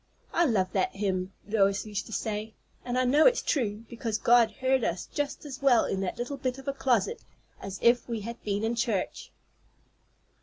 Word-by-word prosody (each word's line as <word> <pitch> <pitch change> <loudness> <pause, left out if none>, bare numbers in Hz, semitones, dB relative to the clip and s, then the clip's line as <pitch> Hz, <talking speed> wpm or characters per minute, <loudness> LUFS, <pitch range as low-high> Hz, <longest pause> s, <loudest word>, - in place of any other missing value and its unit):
"I 345 - +3
love 200 - +1
that 190 - 0
hymn," 190 -2 -1 0.2
Lois 200 -2 +2
used 205 -2 -4
to - - -11
say; 215 0 -3 0.3
"and 245 0 -2
I 255 - +3
know 290 +5 +6
it's - - +3
true, 225 -5 -1
because 230 -2 -3
God 235 -1 +5
heard 260 +3 0
us 175 -2 -1
just 290 +1 -4
as 280 -1 -7
well 260 -4 +5
in 195 - -2
that 190 - -3
little 245 +4 -4
bit 255 -1 -2
of 270 +1 -12
a 275 - 0
closet 270 - 0 0.4
as 195 -1 -6
if 240 +1 +4
we 230 -2 -2
had 235 +3 -7
been 205 0 -1
in 225 +1 +1
church!" 230 -5 -2
230 Hz, 195 wpm, -28 LUFS, 205-260 Hz, 0.4 s, know